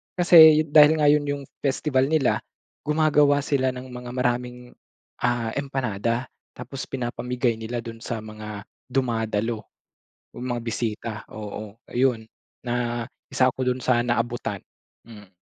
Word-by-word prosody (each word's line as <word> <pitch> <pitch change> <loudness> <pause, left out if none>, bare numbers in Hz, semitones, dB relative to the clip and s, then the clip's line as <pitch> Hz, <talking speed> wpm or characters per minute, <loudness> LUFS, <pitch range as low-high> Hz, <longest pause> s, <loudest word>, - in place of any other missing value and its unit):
Kasi 160 -3 +8
dahil 150 +1 +7
nga 150 - +5
'yon 145 0 +3
'yong 145 -1 -3 0.2
festival 135 -1 +1
nila, 155 -5 +3 0.5
gumagawa 150 -2 +3
sila 135 -3 +1
ng 130 +1 -8
mga 125 -1 -8
maraming, 125 0 -2 0.5
ah, 120 -2 +1
empanada 125 -3 -2 0.3
tapos 135 -2 -7
pinapamigay 125 -1 -2
nila 115 +2 -4
do'n 115 -1 -8
sa 120 - -3
mga 105 -1 -8 0.3
dumadalo 115 -3 -1 0.8
o - - -7
mga 120 -1 -2
bisita, 115 -1 -3 0.2
oo, 105 -1 -7
ayun 120 -3 +1 0.4
na 120 -1 -2 0.3
isa 130 0 +4
ako 130 +1 -4
do'n 125 +1 -2
sa 125 -1 +2
naabutan, 120 -4 -2 0.5
mhm. 105 -4 -13
125 Hz, 130 wpm, -24 LUFS, 115-135 Hz, 0.8 s, Kasi